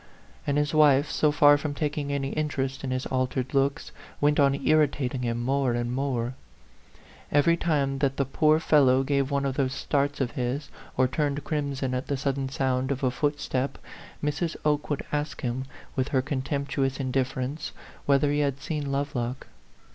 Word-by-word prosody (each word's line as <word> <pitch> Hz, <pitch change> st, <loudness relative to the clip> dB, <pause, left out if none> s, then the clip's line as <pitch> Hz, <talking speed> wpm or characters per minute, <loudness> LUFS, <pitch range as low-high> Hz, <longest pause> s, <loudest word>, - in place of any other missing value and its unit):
And 145 Hz, 0 st, +1 dB
his 150 Hz, +1 st, +1 dB
wife, 145 Hz, -2 st, +5 dB
so 150 Hz, -, +3 dB
far 145 Hz, 0 st, +6 dB
from 145 Hz, -1 st, -3 dB
taking 145 Hz, -1 st, -2 dB
any 140 Hz, -1 st, -1 dB
interest 135 Hz, -3 st, -2 dB
in 135 Hz, -, -2 dB
his 130 Hz, 0 st, -2 dB
altered 130 Hz, 0 st, -1 dB
looks, 140 Hz, 0 st, 0 dB, 0.3 s
went 150 Hz, +1 st, +3 dB
on 140 Hz, -1 st, +4 dB
irritating 140 Hz, -4 st, +1 dB
him 120 Hz, -1 st, -1 dB
more 130 Hz, +1 st, +1 dB
and 120 Hz, 0 st, -1 dB
more. 130 Hz, -2 st, -1 dB, 1.0 s
Every 145 Hz, +4 st, +4 dB
time 140 Hz, -5 st, 0 dB
that 135 Hz, -1 st, 0 dB
the 140 Hz, -, +1 dB
poor 155 Hz, +3 st, +3 dB
fellow 135 Hz, -5 st, +4 dB
gave 140 Hz, 0 st, +1 dB
one 140 Hz, -1 st, 0 dB
of 135 Hz, -1 st, -2 dB
those 135 Hz, -2 st, +1 dB
starts 145 Hz, +1 st, 0 dB
of 130 Hz, -3 st, 0 dB
his, 135 Hz, +2 st, -3 dB, 0.3 s
or 130 Hz, 0 st, +4 dB
turned 145 Hz, +2 st, -1 dB
crimson 140 Hz, -4 st, -2 dB
at 125 Hz, +1 st, -2 dB
the 140 Hz, -, -1 dB
sudden 135 Hz, 0 st, -1 dB
sound 130 Hz, -1 st, 0 dB
of 140 Hz, -1 st, -2 dB
a 130 Hz, -, +3 dB
footstep, 140 Hz, -1 st, -1 dB, 0.5 s
Mrs. 155 Hz, +3 st, -1 dB
Oke 150 Hz, -1 st, +1 dB
would 145 Hz, -, -2 dB
ask 150 Hz, 0 st, -2 dB
him, 125 Hz, +1 st, -2 dB, 0.3 s
with 130 Hz, 0 st, 0 dB
her 135 Hz, -2 st, +1 dB
contemptuous 140 Hz, -1 st, -2 dB
indifference, 135 Hz, +2 st, -2 dB, 0.4 s
whether 140 Hz, +1 st, +4 dB
he 145 Hz, -, +1 dB
had 140 Hz, -2 st, 0 dB
seen 145 Hz, 0 st, -3 dB
Lovelock. 130 Hz, -3 st, -2 dB
140 Hz, 170 wpm, -27 LUFS, 130-145 Hz, 1.0 s, far